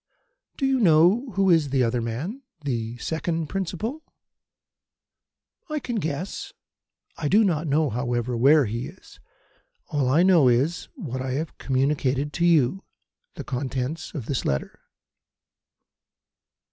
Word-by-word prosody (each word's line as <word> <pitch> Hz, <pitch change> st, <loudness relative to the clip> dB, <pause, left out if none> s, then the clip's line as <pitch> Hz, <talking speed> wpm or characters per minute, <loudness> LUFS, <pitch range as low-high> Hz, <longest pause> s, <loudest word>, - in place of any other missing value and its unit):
"Do 270 Hz, -, 0 dB
you 270 Hz, -1 st, +2 dB
know 185 Hz, -, +4 dB
who 195 Hz, 0 st, +3 dB
is 160 Hz, -4 st, +3 dB
the 135 Hz, -1 st, +2 dB
other 120 Hz, 0 st, 0 dB
man 140 Hz, -, -4 dB, 0.2 s
the 120 Hz, -4 st, -3 dB
second 160 Hz, +2 st, -2 dB
principal?" 195 Hz, -, -3 dB, 1.7 s
"I 305 Hz, -, -2 dB
can 245 Hz, -5 st, -3 dB
guess. 160 Hz, 0 st, -4 dB, 0.6 s
I 150 Hz, -, -2 dB
do 210 Hz, +9 st, +5 dB
not 165 Hz, -5 st, 0 dB
know, 150 Hz, 0 st, +2 dB
however, 120 Hz, +1 st, -1 dB
where 140 Hz, +4 st, +5 dB
he 115 Hz, +5 st, -3 dB
is. 180 Hz, +5 st, -15 dB, 0.7 s
All 145 Hz, -5 st, 0 dB
I 155 Hz, +7 st, +4 dB
know 175 Hz, -7 st, +5 dB
is 130 Hz, +8 st, +1 dB
what 135 Hz, -, -5 dB
I 130 Hz, 0 st, -3 dB
have 155 Hz, +4 st, -3 dB
communicated 135 Hz, +1 st, 0 dB
to 175 Hz, 0 st, +2 dB
you 165 Hz, +2 st, +3 dB, 0.5 s
the -, -, -6 dB
contents 135 Hz, +3 st, -3 dB
of 135 Hz, -7 st, -4 dB
this 135 Hz, -1 st, -2 dB
letter." 70 Hz, -, -2 dB
150 Hz, 135 wpm, -25 LUFS, 130-175 Hz, 1.7 s, do